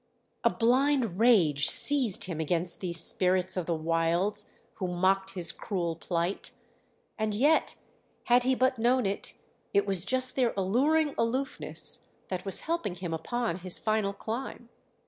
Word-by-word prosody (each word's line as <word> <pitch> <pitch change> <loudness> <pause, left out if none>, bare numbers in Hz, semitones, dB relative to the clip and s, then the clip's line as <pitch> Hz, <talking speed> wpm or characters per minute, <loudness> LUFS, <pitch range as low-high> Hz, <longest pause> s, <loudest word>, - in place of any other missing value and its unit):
A - - +4
blind 245 -4 0
rage 170 - +3
seized 265 -9 +6
him 170 -4 -4
against 170 +2 0
these 170 -3 0
spirits 185 +2 +3
of 180 -3 -3
the 170 - -1
wilds 165 +6 -1 0.3
who 185 - -4
mocked 190 +2 -1
his 170 -3 0
cruel 175 -5 -4
plight; 170 +2 -3 0.7
and 215 -1 -2
yet, 290 +8 +1 0.5
had 245 +1 +3
he 260 +1 +1
but 255 -1 0
known 245 +1 +1
it, 195 +1 -4 0.4
it 200 0 +3
was 195 -3 +3
just 255 +5 -1
their 250 -3 0
alluring 280 +10 +1
aloofness 255 +4 -2 0.2
that 185 0 -5
was 195 -2 +2
helping 315 - -3
him 175 -2 -6
upon 225 +3 -3
his 185 0 +3
final 215 -2 -1
climb. 235 +3 -7
200 Hz, 145 wpm, -27 LUFS, 175-245 Hz, 0.7 s, seized